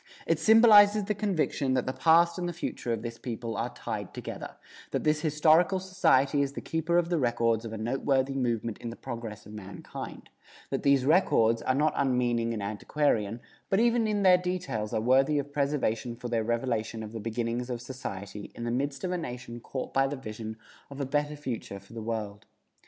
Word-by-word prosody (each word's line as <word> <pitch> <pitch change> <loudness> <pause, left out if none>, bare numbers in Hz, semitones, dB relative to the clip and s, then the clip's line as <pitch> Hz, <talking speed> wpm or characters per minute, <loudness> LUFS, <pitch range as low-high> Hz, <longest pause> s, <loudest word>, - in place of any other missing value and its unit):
It 165 -2 +1
symbolizes 215 0 +7
the 210 +2 -1
conviction 170 -9 0
that 130 - 0
the 130 - -2
past 170 +3 +4
and 175 -1 -2
the - - -4
future 140 -6 -4
of 115 -1 -2
this 115 -1 -6
people 115 -2 -5
are - - -2
tied - - -6
together; - - -7 0.3
that - - -2
this 150 0 +2
Historical 160 +4 +4
Society 150 -7 +2
is 140 -1 -1
the - - -5
keeper 165 +1 0
of 170 -1 +2
the 170 -2 +1
records 115 -2 +1
of 115 - -5
a 110 - -5
noteworthy 135 +4 0
movement 115 -4 -1
in 120 - -5
the 115 - -7
progress 115 -4 -7
of 105 - -11
mankind; 100 -2 -8 0.4
that - - -1
these 140 -2 +3
records 115 -8 +4
are 130 - +1
not 150 +3 +2
unmeaning 120 -4 +1
and 110 -3 -3
antiquarian, 110 +1 0 0.3
but 195 - +3
even 235 -1 +3
in 205 -1 0
their 180 -1 +7
details 180 -13 -3
are 110 - 0
worthy 135 +5 +3
of 145 0 -3
preservation 135 -5 0
for 120 0 -6
their 115 -1 0
revelation 115 -1 -1
of 105 - -7
the 115 - -6
beginnings 115 +2 -2
of 120 -1 -3
society 105 -6 -7
in 115 - -6
the 120 - -1
midst 140 +5 -2
of 185 - -1
a 180 - -1
nation 125 -5 -6
caught 130 +2 -6
by 135 0 +3
the 145 - -3
vision 110 -3 -7 0.3
of 140 0 -9
a 140 - -1
better 145 +2 -1
future 125 -8 -5
for 100 +3 -17
the 115 - -6
world. 110 -3 -4
130 Hz, 200 wpm, -28 LUFS, 115-155 Hz, 0.4 s, symbolizes